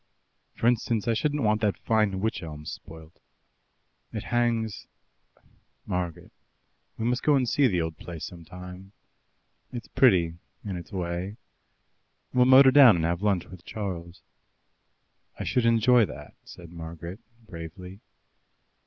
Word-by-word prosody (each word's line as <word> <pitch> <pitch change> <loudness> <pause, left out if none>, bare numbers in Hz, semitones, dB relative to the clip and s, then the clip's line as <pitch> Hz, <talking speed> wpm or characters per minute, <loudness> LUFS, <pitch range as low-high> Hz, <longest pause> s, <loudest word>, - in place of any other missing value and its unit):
For - - -4
instance, 115 -2 +1
I 115 - +3
shouldn't 145 +5 0
want 105 0 +2
that 105 -2 +1
fine 105 -4 +1
wych 110 +2 -1
elm 75 -2 -8
spoilt. 80 +1 -10 0.9
It - - -5
hangs 115 -4 -1 1.0
Margaret, 90 -4 -4 0.7
we 110 - -3
must 125 +2 0
go 150 - +4
and 130 -2 +1
see 140 +3 +3
the 90 -7 0
old 80 -1 -5
place 85 -3 -7
some 85 -2 -10
time. 90 +3 -11 0.8
It's 120 -2 -7
pretty 85 -9 +3 0.3
in 100 -3 -3
its 85 +3 -8
way. 90 +2 -4 1.0
We'll 125 -1 +5
motor 130 +1 +8
down 130 -6 +8
and 80 -2 0
have 85 +2 -1
lunch 100 -4 +1
with 90 -2 -13
Charles." 90 -4 -6 1.2
"I - - -2
should 125 -3 +1
enjoy 115 0 +5
that," - - -10
said 85 -1 -12
Margaret 85 +3 -8 0.3
bravely. 90 +1 -9
95 Hz, 135 wpm, -27 LUFS, 85-115 Hz, 1.2 s, motor